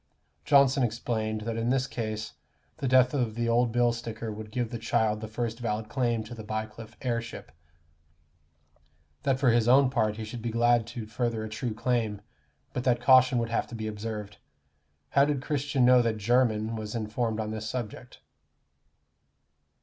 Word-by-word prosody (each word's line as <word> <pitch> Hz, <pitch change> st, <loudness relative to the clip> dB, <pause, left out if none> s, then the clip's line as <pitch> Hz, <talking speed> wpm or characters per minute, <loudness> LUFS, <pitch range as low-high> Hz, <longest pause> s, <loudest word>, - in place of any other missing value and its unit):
Johnson 140 Hz, -1 st, +5 dB
explained, 110 Hz, -2 st, -1 dB
that 115 Hz, +1 st, -3 dB
in 115 Hz, +1 st, 0 dB
this 130 Hz, 0 st, +2 dB
case 110 Hz, -4 st, -4 dB, 0.4 s
the 135 Hz, -, -2 dB
death 130 Hz, 0 st, +5 dB
of 120 Hz, -6 st, -1 dB
the 120 Hz, 0 st, -1 dB
old 120 Hz, 0 st, +2 dB
bill 120 Hz, 0 st, +3 dB
sticker 115 Hz, -1 st, -5 dB
would 105 Hz, 0 st, -8 dB
give 120 Hz, +1 st, -2 dB
the 120 Hz, -, -4 dB
child 110 Hz, -1 st, +1 dB
the 110 Hz, -, -5 dB
first 115 Hz, +1 st, -3 dB
valid 110 Hz, -2 st, -3 dB
claim 120 Hz, -4 st, 0 dB
to 110 Hz, -, -9 dB
the 110 Hz, -2 st, -8 dB
Bycliffe 110 Hz, +1 st, -6 dB
heirship; 115 Hz, -2 st, -3 dB, 1.7 s
that 135 Hz, -1 st, +1 dB
for 130 Hz, -3 st, +4 dB
his 115 Hz, -1 st, +2 dB
own 130 Hz, +1 st, +5 dB
part 110 Hz, -4 st, +1 dB
he 110 Hz, -, -5 dB
should 115 Hz, +2 st, -7 dB
be 120 Hz, -, -2 dB
glad 120 Hz, 0 st, +3 dB
to 115 Hz, -1 st, -6 dB
further 110 Hz, 0 st, -2 dB
a 110 Hz, -, -5 dB
true 110 Hz, +1 st, -4 dB
claim, 115 Hz, -3 st, 0 dB, 0.5 s
but 125 Hz, -, -2 dB
that 125 Hz, -2 st, +2 dB
caution 130 Hz, 0 st, +6 dB
would 115 Hz, -1 st, 0 dB
have 115 Hz, -, -1 dB
to 120 Hz, -, -8 dB
be 110 Hz, -1 st, -4 dB
observed. 105 Hz, -1 st, -5 dB, 0.7 s
How 140 Hz, -, +4 dB
did 145 Hz, -1 st, +1 dB
Christian 140 Hz, -3 st, +1 dB
know 125 Hz, 0 st, +7 dB
that 115 Hz, -2 st, 0 dB
Jermyn, 115 Hz, 0 st, +1 dB
was 110 Hz, 0 st, -5 dB
informed 110 Hz, 0 st, -2 dB
on 110 Hz, -1 st, -2 dB
this 110 Hz, 0 st, -4 dB
subject? 125 Hz, 0 st, -6 dB
115 Hz, 175 wpm, -28 LUFS, 110-125 Hz, 1.7 s, know